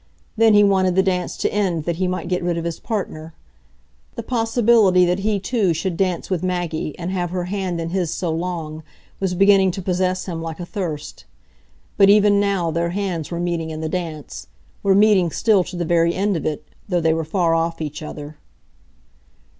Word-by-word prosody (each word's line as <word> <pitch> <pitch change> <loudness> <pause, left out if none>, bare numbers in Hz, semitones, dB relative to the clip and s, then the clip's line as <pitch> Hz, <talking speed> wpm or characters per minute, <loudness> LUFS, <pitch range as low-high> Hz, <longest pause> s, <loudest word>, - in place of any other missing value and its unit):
Then 225 -1 +5
he 205 - +7
wanted 190 -2 +3
the 190 - +4
dance 180 -2 -1
to - - -1
end 185 -6 0
that 170 +1 -2
he 185 0 0
might 180 -1 -3
get 180 0 -1
rid 175 -1 -1
of 165 - -3
his 170 -1 -4
partner. 165 -7 -5 0.8
The 230 - -5
possibility 225 -5 +3
that 180 +2 0
he 205 0 0
too 195 -4 0
should 185 +1 -2
dance 185 -1 -1
with 185 -4 -1
Maggie, 175 -4 -3
and 175 +1 -4
have 180 -2 -2
her 180 0 -2
hand 185 -2 -3
in 165 0 -3
his 175 -2 -1
so 170 -1 -2
long, 160 -2 -4 0.4
was 190 -2 -1
beginning 195 0 +5
to 190 +2 -4
possess 185 0 0
him 170 -3 -5
like 165 0 -6
a 175 - -5
thirst. 160 -7 -5 0.7
But 195 -1 +6
even 205 0 +5
now 195 -5 0
their 170 +1 -1
hands 180 -4 -3
were 170 - -4
meeting 170 -2 -2
in 155 0 -5
the 160 - -2
dance,—were 175 +3 -4
meeting 200 -4 +4
still 200 +3 +2
to 180 - -8
the 175 -1 -2
very 170 0 +2
end 200 0 0
of 160 - -2
it, 150 0 -4 0.2
though 180 -2 +1
they 160 -1 +2
were 165 0 -1
far 165 +1 +1
off 165 0 0
each 150 -1 -5
other. 150 0 -8
180 Hz, 200 wpm, -21 LUFS, 165-195 Hz, 0.8 s, he